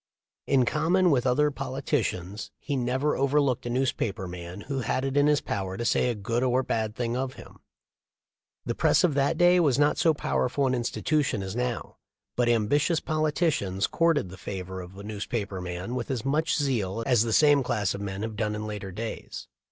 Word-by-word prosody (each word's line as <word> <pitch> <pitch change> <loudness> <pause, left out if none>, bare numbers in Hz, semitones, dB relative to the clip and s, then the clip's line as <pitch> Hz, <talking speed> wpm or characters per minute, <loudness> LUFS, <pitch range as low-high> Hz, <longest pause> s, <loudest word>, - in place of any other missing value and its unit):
In 130 -3 +4
common 170 +6 +2
with 130 -2 +2
other 150 +4 +3
politicians 130 - -3
he 145 - -3
never 130 +3 0
overlooked 140 -3 +1
a - - -2
newspaper 115 -6 -1
man 90 +2 -8
who 135 +4 -3
had 130 +2 -1
it 135 0 -2
in 145 0 +4
his 150 -1 +3
power 95 -1 -3
to 120 - -3
say 125 - +2
a 120 - -1
good 115 +4 -2
or 130 0 +2
bad 110 -3 -2
thing 120 -1 -2
of 130 0 -3
him. - - -13 1.1
The - - -1
press - - +3
of 175 -4 +3
that 140 +3 +1
day 175 +1 +5
was 145 -7 +3
not 145 +1 +3
so 160 -2 +4
powerful 140 -1 0
an 130 - +1
institution 125 -1 0
as 95 +2 -5
now, 125 -1 -3 0.4
but 120 -1 +2
ambitious 145 +9 +2
politicians 155 - 0
courted 165 - +1
the 95 - -10
favor 95 -1 -6
of 90 +2 -11
a 100 - -8
newspaper 105 -2 -4
man 90 +5 -5
with 125 -2 -3
as 130 -3 -2
much 155 +4 +1
zeal 115 - -1
as 125 -4 +4
the 115 0 0
same 145 +3 +5
class 105 -6 0
of 100 - -6
men 100 0 -4
have 110 -1 -4
done 105 0 -1
in 105 0 -4
later 105 -2 -5
days. 110 +5 -6
125 Hz, 195 wpm, -27 LUFS, 105-145 Hz, 1.1 s, day